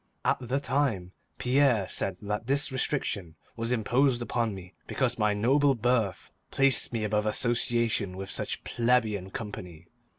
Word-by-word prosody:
At - - +3
the 130 +3 -1
time, 130 -10 -1 0.3
Pierre 125 -6 +2
said 95 -2 -1
that 105 +3 -3
this 140 +1 +4
restriction 105 - -2 0.2
was 115 +1 -2
imposed 120 +2 +2
upon 115 -3 -1
me 90 0 -11
because 125 -3 -1
my 105 -1 +2
noble 135 +6 +3
birth 115 -5 0 0.2
placed 135 -2 +3
me 115 -3 -2
above 105 0 0
association 115 -4 0
with 95 0 -6
such - - -2
plebeian 115 -5 0
company. 90 -6 -8
115 Hz, 140 wpm, -28 LUFS, 100-125 Hz, 0.3 s, this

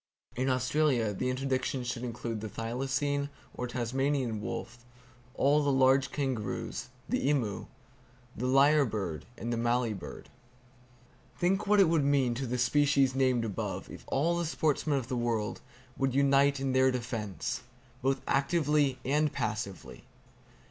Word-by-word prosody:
In 130 +2 0
Australia 130 -3 +1
the 125 +6 -1
interdiction 130 0 -1
should 120 0 -4
include 115 -2 -4
the 110 - -5
thylacine 135 +6 -2 0.2
or 125 - -4
Tasmanian 125 -1 -1
wolf, 120 +2 -6 0.5
all 145 +2 +3
the 145 -1 +2
large 135 0 +4
kangaroos, 130 -7 -3 0.2
the 135 - 0
emu, 120 -9 -1 0.7
lyre 135 +4 +4
bird 100 - -3
and 120 +1 -3
the - - -1
mallee 120 0 +1
bird. 95 - -9 1.1
Think 190 +3 +1
what 205 0 +5
it 195 - +7
would 160 -3 +2
mean 140 -3 +2
to 130 +2 -3
the 125 +2 -1
species 135 +1 +3
named 130 -3 +2
above 105 -4 -4
if - - -10
all 165 +5 +1
the 170 - -1
sportsmen 150 -2 +1
of 130 -4 -3
the 130 - -2
world 115 -3 -1 0.4
would 135 -1 +1
unite 140 0 +4
in 135 -1 -1
their 130 0 +5
defense, 115 -7 -3 0.4
both 135 +1 +1
actively 145 -2 +2
and 150 +3 +2
passively! 105 -7 -4
130 Hz, 140 wpm, -30 LUFS, 120-140 Hz, 1.1 s, it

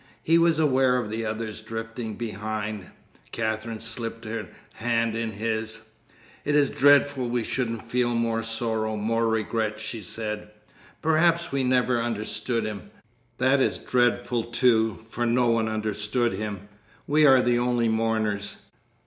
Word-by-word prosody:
He 165 +1 +4
was 165 -2 +4
aware 130 -4 +3
of 110 -4 -3
the 115 +1 -2
others 110 0 -4
drifting 115 0 -5
behind. 105 -2 -4 0.4
Katherine 110 0 -2
slipped 115 0 -4
her 110 -2 -4 0.3
hand 115 0 0
in 115 -1 -2
his. 110 +1 -2 0.6
"It 150 - 0
is 145 -2 +4
dreadful 145 -2 +4
we 120 -1 0
shouldn't 115 -2 -2
feel 120 -1 +1
more 115 -1 0
sorrow, 110 -1 -2
more 115 +2 +1
regret," 110 -1 -1
she 110 +1 -4
said. 105 +2 -4 0.5
"Perhaps 165 +2 +3
we 135 -1 0
never 125 -1 +2
understood 115 0 -2
him. 105 -2 -6 0.5
That 130 +2 +3
is - - +1
dreadful, 120 -1 +1
too; 115 -4 +2
for 120 +1 -2
no 120 +1 +3
one 115 -1 +1
understood 110 +2 -1
him. 100 0 -5 0.4
We 150 +1 +4
are 130 -2 +6
the 120 0 +2
only 120 -1 +1
mourners." 110 -2 0
115 Hz, 140 wpm, -26 LUFS, 110-125 Hz, 0.6 s, are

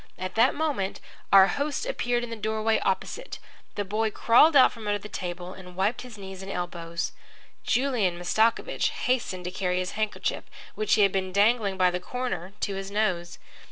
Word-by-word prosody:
At 185 - -5
that 230 +4 +4
moment 285 -11 -1 0.3
our 195 -1 +9
host 285 - -2
appeared 245 - -1
in 240 - -6
the - - -3
doorway 220 0 0
opposite. 445 - -2 0.4
The 205 - -2
boy 215 +3 0
crawled 245 +9 +5
out 265 - +7
from 225 -3 -9
under 205 0 +1
the 205 - -9
table 180 -2 -5
and 180 -1 -12
wiped 195 +6 0
his 245 -4 -10
knees 190 -1 -8
and 195 +1 -6
elbows. 170 -2 -4 0.5
Julian 240 -9 +1
Mastakovich 220 +6 +1
hastened 230 -8 -1
to 180 - -3
carry 180 -1 -1
his 185 0 -2
handkerchief, 215 0 -2 0.3
which 215 0 +2
he 210 - +4
had 195 - +4
been 190 -1 -1
dangling 205 0 +2
by 180 -1 +4
the 180 - -2
corner, 190 -3 -4
to 200 - -1
his 195 0 -5
nose. 185 -5 -1
200 Hz, 185 wpm, -27 LUFS, 185-230 Hz, 0.5 s, our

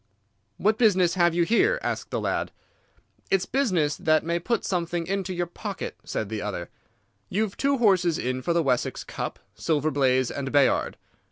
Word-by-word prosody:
"'What 215 +3 +1
business 185 -7 +4
have 175 -2 +3
you 175 - +3
here?' 235 - +3
asked - - -3
the - - -2
lad. - - -1 0.8
"'It's 195 -1 +2
business 185 - +1
that 155 0 +2
may 170 +1 0
put 230 +7 -1
something 175 -2 -1
into 190 +1 -2
your 175 -1 -1
pocket,' 175 - -6
said 110 - -3
the 110 0 -4
other. 95 -4 -5 0.6
'You've 210 +1 -1
two 275 0 +1
horses 185 -8 +3
in 130 +1 -2
for 150 - -1
the 170 -1 +2
Wessex 125 -4 0
Cup—Silver 155 -1 -3
Blaze 130 -3 +2
and 135 -1 -4
Bayard. 140 -2 +2
170 Hz, 165 wpm, -26 LUFS, 145-195 Hz, 0.8 s, business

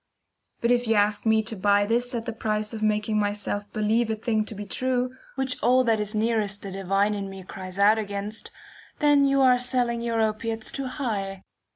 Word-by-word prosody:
But 235 - +2
if 245 -1 +2
you 225 - +3
ask 205 +1 +1
me 220 0 +4
to 225 +1 -3
buy 205 +1 +3
this 240 +3 0
at 230 -1 -3
the 230 - -3
price 215 0 -2
of 220 - -5
making 215 0 +1
myself 205 0 -2
believe 220 +2 +1
a 220 - 0
thing 220 0 0
to 215 - -6
be 205 +1 -6
true, 255 +4 -1 0.2
which 265 -2 -2
all 255 +2 +4
that 225 -3 +2
is 210 +1 -3
nearest 215 -2 0
the 195 - -6
divine 195 +2 +1
in 200 -1 -4
me 195 -1 -9
cries 185 0 -8
out 210 +2 +5
against, 205 +1 -5 0.5
then 290 -2 +4
you 275 0 +3
are 250 -1 +5
selling 245 -2 0
your 230 -1 -1
opiates 220 0 -1
too 275 -1 -4
high. 200 -8 -3
220 Hz, 205 wpm, -25 LUFS, 205-240 Hz, 0.5 s, out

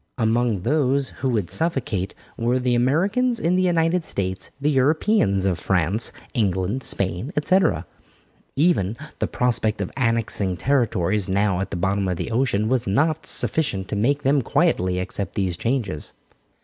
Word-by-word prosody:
Among 115 -3 +1
those 140 0 +1
who 135 - +1
would 105 -8 -1
suffocate 130 - -1 0.2
were 120 +2 0
the 125 -1 0
Americans 195 - +2
in 170 +2 +1
the 185 - +2
United 170 -1 +2
States, 95 -8 -3
the 145 +2 +1
Europeans 135 - +2
of 95 -3 0
France, 95 +4 +2 0.2
England, 100 +2 0
Spain, 95 - -2
etc. 180 +4 +3 0.7
Even 135 - +2 0.2
the - - 0
prospect 115 -4 0
of 100 - -3
annexing 115 -7 0
territories 105 -6 0
now 100 -1 +1
at 95 - -3
the 90 - -4
bottom 95 +2 0
of 90 -2 -1
the 115 - -4
ocean 115 -3 +1
was 125 -1 0
not 155 +10 +1
sufficient 100 -12 0
to - - -2
make 140 +8 +1
them 140 +1 +3
quietly 90 -5 +1
accept 95 0 -3
these 95 -3 -1
changes. 110 - -3
115 Hz, 150 wpm, -23 LUFS, 95-140 Hz, 0.7 s, etc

